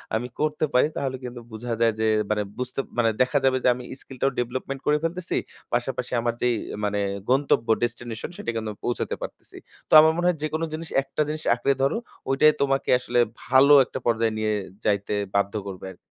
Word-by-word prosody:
আমি 120 +2 -1
করতে 155 0 +1
পারি 125 +4 +5
তাহলে 130 -2 -2
কিন্তু 120 -1 -7
বুঝা 115 +2 -4
যায় 115 -1 +4
যে, 110 - +1 0.3
মানে 105 -1 +1
বুঝতে 125 +2 -4 0.2
মানে 115 -1 +4
দেখা 130 +3 +3
যাবে 130 0 +4
যে - - +3
আমি 125 - -8 0.2
স্কিলটাও 135 +1 -2
ডেভেলপমেন্ট 130 +3 -3
করে 150 0 +3
ফেলতেছি, 170 +1 -2 0.4
পাশাপাশি - - -1
আমার 120 0 0
যেই 125 -1 +2 0.3
মানে 105 0 0 0.3
গন্তব্য 130 -3 +2 0.2
ডেস্টিনেশন 120 +1 -4
সেটা 115 - -3
কিন্তু 110 -1 -3
পৌঁছাতে 120 - -2
পারতেছি। - - -9 0.3
তো - - -2
আমার 160 0 +5
মনে 175 +1 -1
হয় 175 -3 +2
"যেকোনো 155 +2 -1
জিনিস 160 +1 -5
একটা 140 +2 -3
জিনিস 155 0 -4
আঁকড়ে 140 - +1
ধরো, 140 +11 +2 0.3
ওইটাই 150 +3 +5
তোমাকে 135 -1 +1
আসলে 120 -1 0 0.3
ভালো 135 +3 +6
একটা 130 - -6
পর্যায়ে 115 -1 +1
নিয়ে 110 0 0 0.3
যাইতে 100 0 +1 0.2
বাধ্য 100 +1 +1
করবে 95 -1 -7
আরকি" - - -15
125 Hz, 185 wpm, -25 LUFS, 115-140 Hz, 0.4 s, ভালো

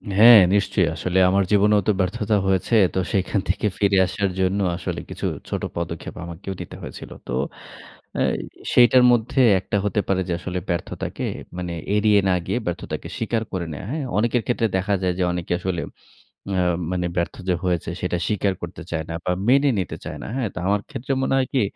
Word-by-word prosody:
হ্যাঁ, 115 +2 +10
নিশ্চয়ই। 100 -2 +2
আসলে 90 +2 -2
আমার 100 +1 +3
জীবনেও 105 0 +4
তো - - +5
ব্যর্থতা 100 +3 0
হয়েছে। 95 +4 +1 0.2
তো - - 0
সেখান 100 +1 +1
থেকে - - 0
ফিরে 100 -1 +3
আসার 100 +1 -1
জন্য 95 +2 +1 0.2
আসলে 85 - -4
কিছু - - -5 0.2
ছোট - - -2
পদক্ষেপ 85 -1 -5
আমাকেও 85 +3 -6
দিতে - - -8
হয়েছিল। - - -9 0.2
তো - - -5 0.8
অ্যা - - +1 0.5
সেইটার 125 +1 +6
মধ্যে 120 +3 +1 0.2
একটা 100 - -2
হতে 105 +1 +1
পারে 95 -1 +1
যে - - +1
আসলে 90 +1 -3
ব্যর্থতাকে 85 0 -3 0.3
মানে 90 -1 -4 0.2
এড়িয়ে 105 -1 +4
না - - +4
গিয়ে 120 - -1
ব্যর্থতাকে 90 - -4
স্বীকার 115 0 -1
করে 90 -2 -2
নেয়া। 85 +6 -7
হ্যাঁ, 150 -1 -2
অনেকের 120 +1 +1
ক্ষেত্রে 115 -2 +1
দেখা 100 +2 0
যায় 90 -1 +1
যে - - +2
অনেকে 90 0 -2
আসলে 90 -2 -2 0.7
অ্যা 95 -2 +1 0.3
মানে 90 -1 -1
ব্যর্থ 85 -1 -1
যে 90 - +3
হয়েছে 90 -3 0
সেটা 90 -1 0
স্বীকার 100 -2 0
করতে 85 -1 -7
চায় 80 -1 -2
না - - -3
বা 90 - +1 0.2
মেনে 140 +2 +5
নিতে 90 - -4
চায় - - -6
না। - - -6
হ্যাঁ, 125 -5 0
তো - - -4
আমার 100 +1 +2
ক্ষেত্রে 135 +4 -4
মনে 135 - +1
হয় 130 - +1
কি 130 - +3
95 Hz, 190 wpm, -23 LUFS, 90-110 Hz, 0.8 s, হ্যাঁ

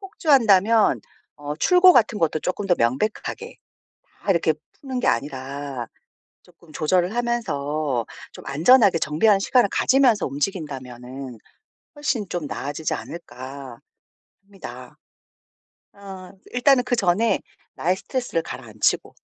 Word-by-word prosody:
폭주한다면 230 - +3 0.4
어 145 0 -5
출고 360 - +6
같은 230 -6 +3
것도 155 -2 0
조금 185 +4 -3
더 180 - +4
명백하게 130 - -2 0.7
다 - - 0
이렇게 170 -3 +3 0.3
푸는 260 -3 -4
게 - - +1
아니라 135 -1 -3 0.5
쪼끔 160 -3 -21
조절을 180 +6 +1
하면서 155 - -1 0.3
좀 - - -12
안전하게 185 - +5
정비하는 180 +7 +2
시간을 245 +1 +3
가지면서 255 -6 +3
움직인다면은 135 - -5 0.6
훨씬 265 -9 -2
좀 175 -5 -4
나아지지 145 +3 -4
않을까?' 135 -6 -9 0.7
합니다. 195 -1 -11 1.0
어 190 -2 -10 0.2
일단은 250 0 +3
그전에 225 -2 +1 0.3
나의 180 +3 0
스트레스를 245 -8 -3
가라앉히고 110 -7 -2
180 Hz, 285 characters per minute, -23 LUFS, 140-230 Hz, 1.0 s, 출고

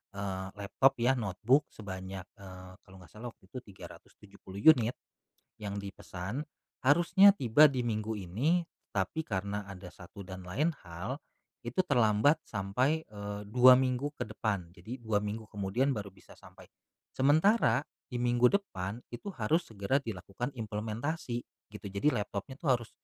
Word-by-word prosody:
eee, 95 -1 -3
laptop 105 +7 +3
ya 120 +3 +4
notebook 120 +5 +2
sebanyak, 95 -2 -7
eee, 95 -1 -11
kalau 95 - -16
enggak 90 - -16
salah 115 +3 -7
waktu 95 - -26
itu 125 +6 -7
370 100 -1 -13 0.2
unit 120 -3 -2 0.7
yang 100 -1 -4
dipesan. 100 +4 -6 0.4
Harusnya 175 +8 +7
tiba 130 +5 +6
di 130 -2 -1
minggu 110 -1 -1
ini, 125 - +1 0.3
tapi 100 - -1
karena 100 +1 -3
ada 90 -2 -9
satu 100 +2 -12
dan 95 0 -8
lain 150 - +1
hal, 90 - -5 0.5
itu 120 +10 +1
terlambat 120 - +4
sampai, 125 +11 0
eee, 105 -1 -6
2 125 +3 +8
minggu 130 +2 0
ke - - -1
depan, 100 -5 -3
jadi 110 +9 -8
2 110 -3 +1
minggu 105 +2 -4
kemudian 105 +7 0
baru 105 -4 -5
bisa 95 - -18
sampai. - - -15 0.5
Sementara 145 - +4 0.2
di 125 - -8
minggu 120 0 +4
depan 110 - -2
itu 120 - -8
harus 160 +10 +1
segera 110 +5 0
dilakukan 115 +2 -5
implementasi 115 +4 -3 0.3
gitu, 105 0 -11
jadi 100 +10 +2
laptopnya 105 +3 -4
tuh 150 - -2
harus 115 - -11
110 Hz, 145 wpm, -31 LUFS, 100-130 Hz, 0.7 s, 2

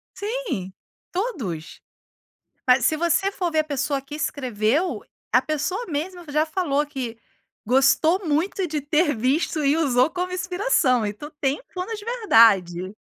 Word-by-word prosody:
Sim, 405 - -4 0.4
todos. 260 - -4 0.9
Mas 250 -1 +5
se 310 - +3
você 345 +4 +1
for 360 -3 -2
ver, 315 - 0
a - - -1
pessoa 280 -1 -1
que 275 +2 -10
escreveu, 260 - -1 0.3
a - - +5
pessoa 310 +9 -2
mesmo 345 +3 -4
já 305 +2 +2
falou 300 -4 0
que 250 -6 -6 0.5
gostou 310 - +3
muito 350 +5 0
de 300 -2 -2
ter 295 -1 +1
visto 285 +6 0
e 280 +3 +3
usou 265 -2 +3
como 365 0 -3
inspiração. 360 - +1
Então, 215 +9 -6
tem 275 +1 0
um - - -22
plano 370 +5 -4
de 420 -1 -8
verdade. 215 - +3
300 Hz, 145 wpm, -23 LUFS, 255-360 Hz, 0.9 s, Mas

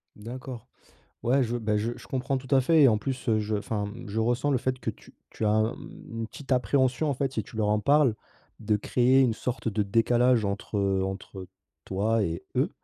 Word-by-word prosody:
D'accord. 120 +2 -8 0.5
Ouais 125 +4 +2
je 120 0 -2
bah, 105 -2 0
je 110 +3 -1
je - - -13
comprends 135 +1 -1
tout 130 +1 -4
à 135 - +6
fait 160 +4 +4
et - - +8
en 110 -3 +4
plus, 130 +2 -4
heu, 110 -1 +3
je 105 0 -1
enfin, 105 0 -2
mmh, 105 +3 -8
je 110 +2 -2
ressens 120 +5 +1
le 135 - +3
fait 130 +1 -1
que 115 - -3
tu 110 - -11 0.2
tu 110 - -4
as, 105 +1 +3
mmh, - - -12
une 115 - -3
petite 140 +3 -10
appréhension 130 +3 +2
en - - +1
fait, 135 0 -2
si 110 - -2
tu 110 - -14
leur 110 -2 +1
en 105 0 +2
parles, 140 +1 +3 0.4
de 110 -1 +1
créer 125 +5 +3
une 125 -4 +3
sorte 120 0 -4
de 105 0 0
décalage 120 +3 +3
entre 100 +1 -3 0.3
entre 95 0 -6 0.4
toi 105 +3 +1
et 85 -2 -3
eux, - - +2
115 Hz, 220 wpm, -27 LUFS, 105-130 Hz, 0.5 s, et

